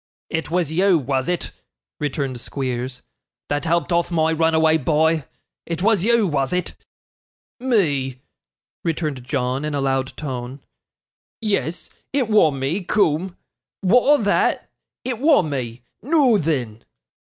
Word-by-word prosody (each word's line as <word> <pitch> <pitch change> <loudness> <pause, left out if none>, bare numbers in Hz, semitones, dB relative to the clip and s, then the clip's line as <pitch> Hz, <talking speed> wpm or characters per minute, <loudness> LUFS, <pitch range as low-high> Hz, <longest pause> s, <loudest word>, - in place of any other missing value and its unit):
'It 160 0 -2
was 170 -2 0
you, 185 +2 +4
was 135 -1 -1
it,' 180 - -2 0.5
returned 135 -3 -2
Squeers, 125 0 -4 0.5
'that 145 +2 -1
helped 170 +2 +1
off 170 0 +2
my 160 -2 +2
runaway 160 0 +3
boy? 160 +1 +2 0.4
It 170 +1 -3
was 215 -4 +3
you, 235 0 +3
was 140 -6 0
it?' 180 -1 -1 0.9
'Me!' 145 - +1 0.6
returned 155 -6 -2
John, 130 0 -1
in 150 -1 -2
a - - 0
loud 135 -1 -1
tone. 130 -2 -5 0.8
'Yes, 200 -6 -2 0.2
it 265 -5 +1
wa' 210 -7 +5
me, 140 +7 -2
coom; 180 -2 +1 0.5
wa'at 250 +9 +5
o' - - -2
that? 205 - +1 0.3
It 250 -3 -2
wa' 290 - +5
me. 125 -6 -4 0.2
Noo 270 -6 +3
then! 125 -9 -2
160 Hz, 130 wpm, -21 LUFS, 135-185 Hz, 0.9 s, wa